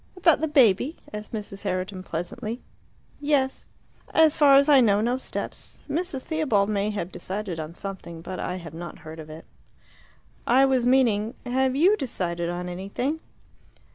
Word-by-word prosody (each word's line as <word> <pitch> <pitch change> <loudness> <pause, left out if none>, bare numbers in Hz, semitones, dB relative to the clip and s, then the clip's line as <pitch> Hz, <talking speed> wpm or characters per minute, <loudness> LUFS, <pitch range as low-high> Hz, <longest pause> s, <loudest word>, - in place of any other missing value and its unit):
"About 335 -5 +4
the 315 - +1
baby?" 275 - +4 0.2
asked 210 0 -6
Mrs. 205 -3 -6
Herriton 185 +1 -3
pleasantly. 185 +7 -4 0.6
"Yes." 285 -2 0 0.5
"As 320 -1 +6
far 285 -2 +6
as 280 +1 +6
I 285 -3 +7
know, 205 -4 +4
no 240 +4 0
steps. - - -5
Mrs. 295 -3 -2
Theobald 265 -11 +1
may 205 0 0
have 200 -4 -4
decided 185 0 -4
on 160 +2 -6
something, 180 -5 -7
but 185 +1 -6
I 180 - -3
have 170 -4 -8
not 170 +1 -7
heard 160 +1 -8
of 155 -1 -9
it." 155 +1 -10 1.0
"I 260 +3 +6
was 260 -2 +2
meaning, 235 -3 +3
had 260 +1 +1
you 370 +8 +5
decided 175 - -3
on 175 +1 -4
anything?" 200 - -3
215 Hz, 160 wpm, -25 LUFS, 185-270 Hz, 1.0 s, I